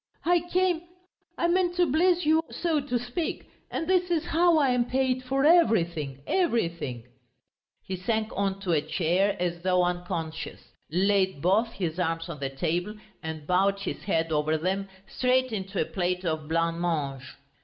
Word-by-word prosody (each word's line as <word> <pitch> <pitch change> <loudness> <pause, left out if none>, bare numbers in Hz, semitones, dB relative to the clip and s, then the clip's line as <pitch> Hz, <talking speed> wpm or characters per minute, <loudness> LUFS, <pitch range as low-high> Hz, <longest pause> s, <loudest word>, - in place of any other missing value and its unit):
I 350 +1 +4
came... 365 -2 +2 0.6
I 340 - +2
meant 350 0 +2
to 355 0 +4
bless 345 +4 +2
you, 315 +1 +4
so 330 -3 0
to 270 -3 -1
speak. 245 +8 -4 0.2
And 325 - -3
this 360 -1 +2
is 335 -2 0
how 340 0 +3
I 280 -3 +3
am 250 -1 +2
paid, 255 0 0
for 270 +2 0
everything, 170 - +3
everything!..." 170 - 0 0.8
He 190 - -4
sank 220 +4 -1
on 195 0 -1
to 190 -3 -1
a 155 -3 +3
chair 185 +6 +1
as 175 -1 -2
though 180 0 +2
unconscious, 175 -3 -4 0.2
laid 190 0 +2
both 210 +8 +2
his 175 -3 -3
arms 165 -1 -1
on 160 -4 -6
the 135 -1 -2
table, 175 +8 -2 0.3
and 160 -2 -6
bowed 195 +3 +2
his - - -4
head 165 -4 0
over 155 +1 +1
them, 190 +4 -2 0.2
straight 255 +2 +1
into 195 -2 -3
a - - +2
plate 180 +1 -2
of 155 -2 -2
blancmange. 165 -5 -1
190 Hz, 165 wpm, -27 LUFS, 165-265 Hz, 0.8 s, I